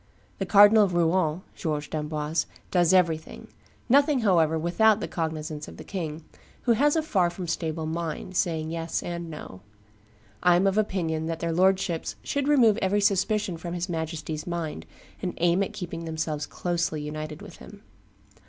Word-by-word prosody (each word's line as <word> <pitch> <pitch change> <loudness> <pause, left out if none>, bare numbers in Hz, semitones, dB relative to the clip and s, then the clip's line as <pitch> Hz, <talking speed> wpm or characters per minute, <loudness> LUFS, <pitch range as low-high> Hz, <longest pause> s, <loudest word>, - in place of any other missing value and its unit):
The 195 - -2
Cardinal 205 +2 +7
of 180 -3 -3
Rouen 170 0 +1
[George 150 -3 -3
d'Amboise] 155 0 -2 0.2
does 175 -3 +3
everything; 170 -4 +1 0.4
nothing, 280 +1 +4
however, 165 -6 +3
with 170 +6 -3
out 220 -1 +6
the - - -3
cognizance 155 -2 -4
of - - -11
the - - -9
king, 165 -5 -5 0.4
who 240 - +2
has 290 +7 +3
a 320 - +1
far 185 - +2
from 175 +1 -6
stable 160 -1 -2
mind, 165 +2 -4
saying 160 -3 0
yes 165 0 -3
and 170 -1 -5
no.... 95 - -9 0.8
I 180 -1 +5
am 180 +3 +3
of 195 +2 +3
opinion 165 -6 -1
that 165 -1 -3
their 170 0 -1
lordships 185 -1 +1
should 280 -1 -1
remove 240 -8 +5
every 200 0 +1
suspicion 200 -1 +1
from 170 +1 -5
his 175 +2 -3
Majesty's 160 -1 -4
mind, 160 - -4 0.3
and 180 -2 -3
aim 175 +2 +2
at 195 - -1
keeping 175 -5 -6
themselves 155 -2 -3
closely 170 -3 -2
united 155 0 -6
with - - -11
him." - - -13
170 Hz, 170 wpm, -26 LUFS, 160-195 Hz, 0.8 s, Cardinal